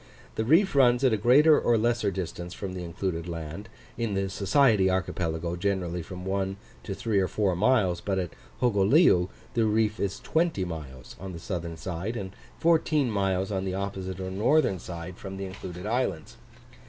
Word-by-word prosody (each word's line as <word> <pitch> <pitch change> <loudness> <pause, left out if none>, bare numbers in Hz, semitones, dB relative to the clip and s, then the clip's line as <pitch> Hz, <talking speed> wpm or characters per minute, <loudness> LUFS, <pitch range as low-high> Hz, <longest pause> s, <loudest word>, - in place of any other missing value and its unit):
The 110 - -1
reef 165 - +4
runs 125 -2 +4
at 130 -4 +4
a - - +4
greater 140 +9 +6
or 120 - +3
less 115 +1 +1
distance 90 -3 -3
from 95 -2 -5
the 90 -1 -5
included 85 0 -3
land; 85 +6 -6 0.3
in 115 -4 -1
the 95 0 -1
Society 105 -1 +3
archipelago 85 -2 -1
generally 90 -2 -1
from 90 +2 -8
one 95 0 -1 0.2
to 100 - -5
three 110 -2 0
or 95 - +2
four 100 -3 0
miles; 100 -4 +2
but 95 -2 -1
at 90 -3 -3 0.3
Hogoleu 100 - +4 0.2
the 115 -1 +2
reef 110 0 +1
is 100 0 -2
20 160 - 0
miles 70 -7 -8
on 95 -1 -7
the 85 - -7
southern 85 -2 -5
side, 95 +8 -4
and 95 -3 -5 0.3
14 155 -5 +2
miles 95 -1 0
on 95 -1 -1
the 95 -1 -2
opposite 95 -1 -4
or 95 0 -4
northern 105 0 +2
side, 85 +1 -7
from 95 -1 -7
the 95 - -4
included 95 -1 -8
islands. 105 -8 -2
95 Hz, 180 wpm, -27 LUFS, 90-110 Hz, 0.3 s, greater